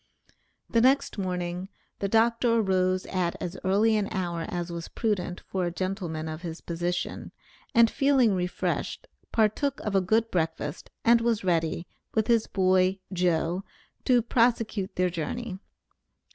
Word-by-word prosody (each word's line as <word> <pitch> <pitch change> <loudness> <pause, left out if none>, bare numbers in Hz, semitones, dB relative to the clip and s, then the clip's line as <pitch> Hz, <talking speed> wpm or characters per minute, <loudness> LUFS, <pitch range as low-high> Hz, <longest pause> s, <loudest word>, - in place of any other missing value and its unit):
The 230 - +2
next 260 -3 +3
morning 180 0 -3 0.3
the 200 - 0
Dr. 230 +2 +3
arose 185 -3 +2
at 180 -2 -1
as 180 +1 -4
early 205 +4 +3
an 210 -2 +1
hour 175 -3 -2
as 175 -1 -3
was 170 -1 -5
prudent 185 -5 -2
for 190 -1 -3
a 175 - -1
gentleman 175 -4 -3
of 155 +1 -5
his 165 -2 -6
position, 175 +1 -3 0.4
and 235 0 +7
feeling 265 -3 +3
refreshed, 180 -1 -2 0.3
partook 235 +6 +1
of 210 - -3
a 195 - +4
good 220 +5 +1
breakfast, 160 -2 -2 0.2
and 235 0 +6
was 230 -3 +1
ready, 165 -2 0 0.3
with 220 -1 +3
his 230 -2 +2
boy, 185 0 +3 0.2
"Joe," 175 0 +1 0.4
to 245 -3 +4
prosecute 230 -4 +1
their 180 0 +1
journey. 190 +5 -4
190 Hz, 145 wpm, -27 LUFS, 175-225 Hz, 0.4 s, and